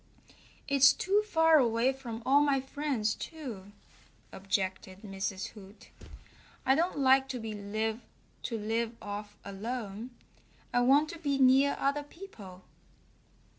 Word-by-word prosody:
"It's 275 0 +6
too 400 +3 +1
far 325 -4 +5
away 240 +1 +2
from 240 -4 -8
all 280 +2 +5
my 285 -2 +2
friends, 265 -5 -2
too," 235 - -8 0.6
objected 190 0 -3
Mrs. 195 -1 -4
Hoot. 200 -1 -15 0.7
"I 265 - +5
don't 335 +3 0
like 265 -1 +4
to 255 - -4 1.0
live 225 +1 -2
off 205 0 -7
alone. 215 +2 -5 0.6
I 245 - +3
want 275 +5 +4
to 335 - -8
be 285 -4 0
near 270 +1 +5
other 280 +2 +1
people." 225 - -12
255 Hz, 115 wpm, -30 LUFS, 210-280 Hz, 1.0 s, It's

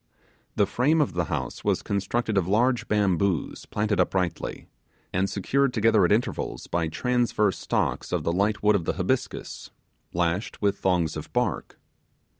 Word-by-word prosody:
The 100 - +4
frame 135 +10 +2
of 150 - +1
the 85 -1 0
house - - -4
was - - +1
constructed 100 +3 -1
of 95 -3 +2
large 120 +5 +2
bamboos 100 -4 0
planted 105 -2 -1
uprightly, 90 -1 -1 0.5
and 95 +2 +1
secured 135 +6 0
together 110 -2 +4
at 85 - +1
intervals 110 +4 -1
by 85 -2 -1
transverse 115 +1 +1
stalks - - -1
of - - 0
the 85 - 0
light 100 +4 0
wood 105 0 +5
of 90 -5 -1
the - - 0
habiscus, - - -3 0.4
lashed 85 +4 -1
with 100 -1 0
thongs 85 -4 +1
of 80 - -7
bark. 125 - -1
100 Hz, 155 wpm, -26 LUFS, 90-115 Hz, 0.5 s, wood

